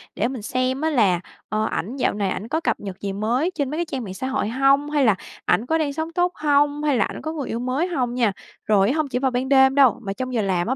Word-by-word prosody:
để 225 - +1
mình 255 -2 -5
xem 255 +5 -1
á 320 - +1
là, 210 - +3 0.3
ờ, 215 0 0
ảnh 225 +5 -3
dạo - - +1
này 205 -2 -1
ảnh 195 +3 -4
có 315 +6 0
cập - - 0
nhật 195 -2 -7
gì 200 -1 -3
mới 240 - 0
trên 285 -5 -1
mấy 300 - -4
cái 345 - 0
trang 270 -6 -4
mạng 190 - -6
xã 225 +7 -4
hội 265 -4 -1
hông? 275 +4 +3
Hay 295 -2 +2
là 220 -4 +4 0.3
ảnh 210 +7 +2
có 320 - +1
đang 300 -3 -1
sống 320 +2 -4
tốt 355 +1 +1
hông? 290 0 +2
Hay 290 -4 +2
là - - +3
ảnh - - -7
có 315 - -4
người 290 -5 -4
yêu 230 - -2
mới 260 +8 -1
hông 255 -8 -1
nha? 235 -5 +2 0.3
Rồi 205 +1 +3
hông 310 +1 0
chỉ 255 -2 -2
vào 265 0 +1
ban 250 +2 -2
đêm 265 -1 +5
đâu, 265 -3 +5
mà 195 -3 -4
trong 255 +3 -5
giờ 230 - +1
làm 185 -3 0
á 260 - 0
260 Hz, 290 wpm, -22 LUFS, 220-290 Hz, 0.3 s, đêm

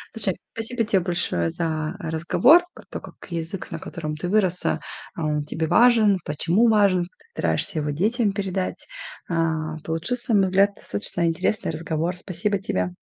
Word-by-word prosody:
Слушай, 195 -5 0 0.2
спасибо 230 +1 -2
тебе 200 -4 +2
большое 170 - 0
за 155 - -2
разговор 200 - +4
про - - -14
то, - - -6
как - - -13
язык, 170 +2 -5
на - - -4
котором 155 -2 -5
ты 175 +3 -4
выросла, 185 -3 +2 0.4
а 165 - -3
он 150 -1 0
тебе 160 +2 -3
важен, 225 -2 +5
почему 170 +10 +2
важен, 200 -4 +4
как 175 - -9
ты - - -24
стараешься 165 - 0
его 150 0 -2
детям 205 - +1
передать, 190 -2 -3 0.4
а. 160 -2 0
Получился, 230 +10 -2
на 205 - +6
мой 195 - +4
взгляд, 195 +2 +4
достаточно 105 - -1
интересный 165 +3 0
разговор. 160 +2 -2
Спасибо 190 +3 -1
тебе. 90 - -2
175 Hz, 165 wpm, -24 LUFS, 160-205 Hz, 0.4 s, на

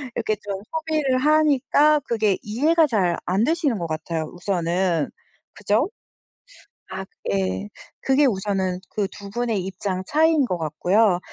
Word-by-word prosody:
이렇게 220 -2 0
좀 195 -1 -4
소비를 310 -5 0
하니까 300 0 +4
그게 215 -5 +1
이해가 305 +10 +2
잘 190 -9 +1
안되시는 250 - +1
것 175 - -3
같아요 160 0 -3
우선은. 175 -2 0 0.4
그죠? 210 - +1 1.1
아 190 0 -5 0.3
예. 95 0 -1 0.3
그게 270 +2 +3
우선은 190 -5 0
그 205 -2 -1
두 200 -1 -10
분의 230 -1 -1
입장 190 -1 -3
차이인 315 -1 +3
것 180 -7 -2
같고요. 175 +5 +2
210 Hz, 260 characters per minute, -23 LUFS, 180-280 Hz, 1.1 s, 하니까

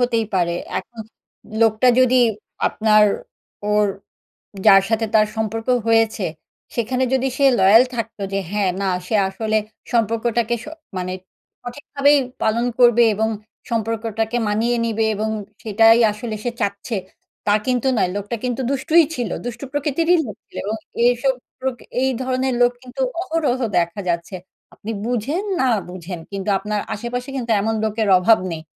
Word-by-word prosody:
হতেই 235 -2 +1
পারে, 175 -2 +1 0.3
এখন 235 -2 -10 0.6
লোকটা 225 +2 +4
যদি 255 0 +4 0.5
আপনার 215 -1 +4 0.6
ওর 210 0 +2 0.8
যার 195 0 +8
সাথে 225 0 +1
তার 215 -1 +6
সম্পর্ক 220 +1 -3 0.2
হয়েছে, 225 -3 +2 0.5
সেখানে 250 +2 0
যদি 265 0 +2
সে 280 - +3
লয়াল 200 +5 +7
থাকতো 225 -2 -5
যে, 195 - +1
হ্যাঁ 205 -2 +1
না 195 - 0 0.2
সে 220 - 0
আসলে 215 +3 -1 0.4
সম্পর্কটাকে 230 +1 +1
স - - -11 0.3
মানে 185 0 -3 0.5
সঠিকভাবেই 285 +3 +1 0.2
পালন 230 +2 +1
করবে 240 -1 +6
এবং 220 +2 0 0.4
সম্পর্কটাকে 225 0 -1
মানিয়ে 225 +4 +1
নিবে 225 -1 0
এবং 215 +2 -2 0.3
সেটাই 225 +1 +5
আসলে 215 +1 -5
সে 245 - 0
চাচ্ছে, 200 +3 -2 0.5
তা 205 - +3
কিন্তু 250 0 +1
নয় 180 - +2
লোকটা 205 +3 -3
কিন্তু 250 0 -2
দুষ্টুই 310 +5 +4
ছিল, 240 -3 -2 0.2
দুষ্টু 240 +2 -5
প্রকৃতিরই 315 +5 +2
লোক 210 - -7
ছিল - - -21
এবং 215 +2 -2 0.3
এসব 245 +2 +2 0.3
প্রকৃ 260 -1 -4 0.2
এই 265 - +2
ধরনের 260 0 0
লোক 245 0 +5
কিন্তু 255 +1 -7 0.2
অহরহ 315 -8 0 0.2
দেখা 170 +3 0
যাচ্ছে। 170 +2 -2 0.4
আপনি 220 - -7
বুঝেন 250 - -1 0.2
না 265 - +3 0.2
বুঝেন, 180 -1 -7
কিন্তু 195 +1 -4
আপনার 210 +1 -3
আশেপাশে 245 +4 -4
কিন্তু 240 -3 -2
এমন 225 +1 0
লোকের 220 0 0
অভাব 215 +5 +4
নেই। 160 -1 -5
225 Hz, 145 wpm, -20 LUFS, 210-245 Hz, 0.8 s, যার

